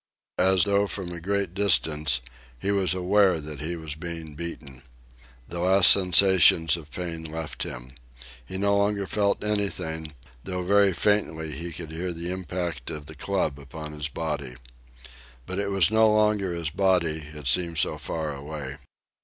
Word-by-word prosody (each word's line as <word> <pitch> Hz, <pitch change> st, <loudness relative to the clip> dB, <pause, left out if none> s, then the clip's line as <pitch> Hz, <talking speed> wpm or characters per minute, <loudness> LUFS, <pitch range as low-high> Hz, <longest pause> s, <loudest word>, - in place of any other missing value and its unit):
As 95 Hz, 0 st, +4 dB
though 100 Hz, 0 st, +2 dB
from 95 Hz, -3 st, -5 dB
a 85 Hz, -1 st, -7 dB
great 100 Hz, 0 st, -1 dB
distance, 75 Hz, -9 st, +2 dB, 0.4 s
he 100 Hz, +11 st, -2 dB
was 95 Hz, -2 st, +2 dB
aware 95 Hz, -1 st, +3 dB
that 75 Hz, -1 st, -7 dB
he 85 Hz, +3 st, -3 dB
was 80 Hz, -2 st, -6 dB
being 80 Hz, -1 st, -7 dB
beaten. 75 Hz, -5 st, -8 dB, 0.7 s
The 85 Hz, -, -6 dB
last 95 Hz, +2 st, +6 dB
sensations 90 Hz, -4 st, +5 dB
of 80 Hz, -4 st, -9 dB
pain 85 Hz, -1 st, -5 dB
left 80 Hz, 0 st, -5 dB
him. 60 Hz, 0 st, -6 dB, 0.5 s
He 95 Hz, +10 st, -6 dB
no 100 Hz, +1 st, +2 dB
longer 100 Hz, 0 st, +1 dB
felt 100 Hz, 0 st, 0 dB
anything, 80 Hz, -7 st, -2 dB, 0.3 s
though 90 Hz, -1 st, -4 dB
very 100 Hz, +1 st, +4 dB
faintly 80 Hz, -6 st, 0 dB
he 85 Hz, +1 st, -6 dB
could 80 Hz, -1 st, -6 dB
hear 85 Hz, +2 st, -4 dB
the 85 Hz, +1 st, -5 dB
impact 90 Hz, -3 st, -4 dB
of 75 Hz, -1 st, -6 dB
the 80 Hz, -, -9 dB
club 80 Hz, -2 st, -2 dB
upon 75 Hz, +2 st, -8 dB
his 75 Hz, -1 st, -4 dB
body. 75 Hz, -4 st, -4 dB, 0.9 s
But 95 Hz, +5 st, -4 dB
it 100 Hz, 0 st, -1 dB
was 95 Hz, -2 st, +3 dB
no 110 Hz, 0 st, +5 dB
longer 105 Hz, -3 st, +2 dB
his 85 Hz, -3 st, -3 dB
body, 90 Hz, -3 st, +2 dB, 0.2 s
it 75 Hz, -2 st, -8 dB
seemed 85 Hz, +5 st, +2 dB
so 75 Hz, -, +1 dB
far 80 Hz, -2 st, -4 dB
away. 70 Hz, -1 st, -7 dB
85 Hz, 160 wpm, -26 LUFS, 75-95 Hz, 0.9 s, last